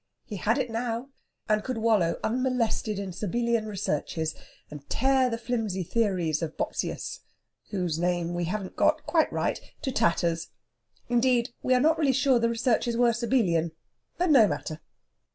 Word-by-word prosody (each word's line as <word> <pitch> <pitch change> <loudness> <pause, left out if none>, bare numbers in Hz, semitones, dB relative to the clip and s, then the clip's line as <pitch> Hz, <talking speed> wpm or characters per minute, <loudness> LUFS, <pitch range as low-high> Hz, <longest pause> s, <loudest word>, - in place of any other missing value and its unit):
He 210 - -6
had 220 +5 +1
it 235 - -1
now, 235 +2 -3 0.4
and 215 0 +2
could 255 -2 -3
wallow 215 -7 +2
unmolested 235 -3 0
in 195 -1 -4
Sabellian 230 +4 -1
researches, 160 -5 -2 0.4
and 145 -1 -10
tear 265 0 +3
the 230 - -2
flimsy 225 -6 -2
theories 180 -7 0
of 160 -1 -4
Bopsius - - -3 0.5
whose 180 -6 -2
name 175 -1 0
we 175 0 -1
haven't 190 +2 -4
got 310 0 +2
quite 325 -2 +2
right - - -1 0.2
to 265 - -1
tatters. 170 -5 +1 0.6
Indeed, 245 0 +2
we 255 - +3
are - - +4
not 315 +5 +3
really 280 -4 +3
sure 265 -1 +3
the 230 0 +2
researches 235 0 +1
were 240 -1 +4
Sabellian. 215 -9 +1 0.4
But 355 -2 +2
no 240 -7 +7
matter! 155 -4 -4
225 Hz, 155 wpm, -27 LUFS, 180-250 Hz, 0.6 s, no